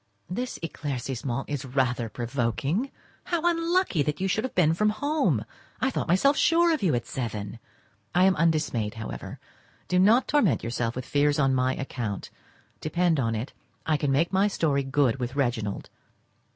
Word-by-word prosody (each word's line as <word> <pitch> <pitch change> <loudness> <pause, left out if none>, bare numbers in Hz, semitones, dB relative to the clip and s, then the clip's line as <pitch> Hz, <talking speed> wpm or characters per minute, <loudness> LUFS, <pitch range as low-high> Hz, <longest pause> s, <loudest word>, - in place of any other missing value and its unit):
This 245 +7 -3
éclaircissement 135 -4 -3
is 145 -2 -3
rather 125 -3 0
provoking. 130 - -1 0.4
How 345 -2 -1
unlucky 340 - +1
that 150 +1 -1
you 190 - 0
should 210 +3 0
have 260 - -4
been 160 -3 +4
from 210 +5 +2
home! 290 +8 0 0.3
I 260 - +1
thought - - -2
myself 275 +12 +4
sure 335 +1 +4
of 310 - -1
you 170 -9 +2
at 120 - -2
seven! 110 -3 -5 0.6
I 180 - +5
am 190 0 +5
undismayed 150 -10 0
however. 110 - -7 0.5
Do 180 - +2
not 220 +7 +5
torment 245 - +2
yourself 115 0 -2
with 130 0 -5
fears 145 0 +2
on 135 -2 +3
my 130 0 +1
account; 120 -7 -4 0.5
depend 165 0 +1
on 115 -3 0
it, 115 +5 -4 0.3
I 155 - +2
can 145 -2 0
make 160 +7 +1
my 195 +2 +4
story 150 -8 +1
good 135 -2 +1
with 125 +1 -3
Reginald. 120 -7 -2
145 Hz, 165 wpm, -26 LUFS, 125-190 Hz, 0.6 s, I